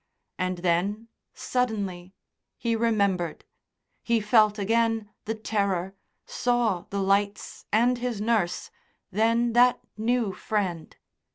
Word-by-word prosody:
And 185 0 -1
then, 200 +6 0 0.3
suddenly, 200 -7 -2 0.4
he 230 -1 0
remembered.... 200 -7 0 0.6
He 235 -1 +1
felt 215 0 +4
again 225 +1 +1
the 225 - -2
terror, 200 -4 -1 0.3
saw 240 -7 0
the 200 - -2
lights 200 +1 -1
and 240 +3 +3
his 240 -3 -2
nurse, 210 -5 0 0.4
then 230 +3 +2
that 245 +1 +5 0.2
new 225 -2 0
friend.... 185 -7 -3
215 Hz, 105 wpm, -26 LUFS, 195-230 Hz, 0.6 s, that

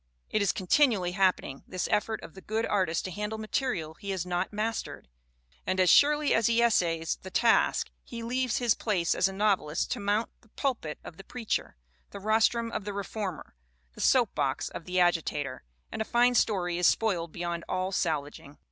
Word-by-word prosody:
It 215 - +1
is 200 - +3
continually 195 -2 +2
happening, 185 -7 0
this 185 - -3
effort 220 +1 0
of - - -10
the 190 - -12
good 220 +3 -1
artist 185 -5 0
to 185 - -4
handle 210 +4 -4
material 215 - -2
he 200 +5 -9
has 190 -3 -2
not 180 +1 -2
mastered; 220 +2 -3 0.6
and 185 0 -1
as 185 -1 +5
surely 295 0 +5
as 225 - +3
he 235 0 +2
essays 170 -8 +2
the 190 - -8
task 230 +4 +2
he 230 -1 -7
leaves 250 +1 0
his 240 -3 +3
place 185 -8 0
as 190 - +2
a - - -4
novelist 195 -6 0
to - - -1
mount 205 +3 0
the 225 - -25
pulpit 225 - -3
of 165 - -10
the 195 - -10
preacher, 230 0 -3 0.3
the - - -8
rostrum 225 +3 +2
of 215 - -3
the 205 0 -5
reformer, 200 -2 -5 0.4
the - - -9
soapbox - - +2
of - - -8
the 180 0 0
agitator 155 -6 0 0.3
and - - -4
a - - +2
fine 240 +2 +3
story 180 -7 +1
is 180 - +5
spoiled 175 -7 +1
beyond 170 0 -4
all 185 +1 -1
salvaging. 150 -4 -3
195 Hz, 185 wpm, -28 LUFS, 175-225 Hz, 0.6 s, as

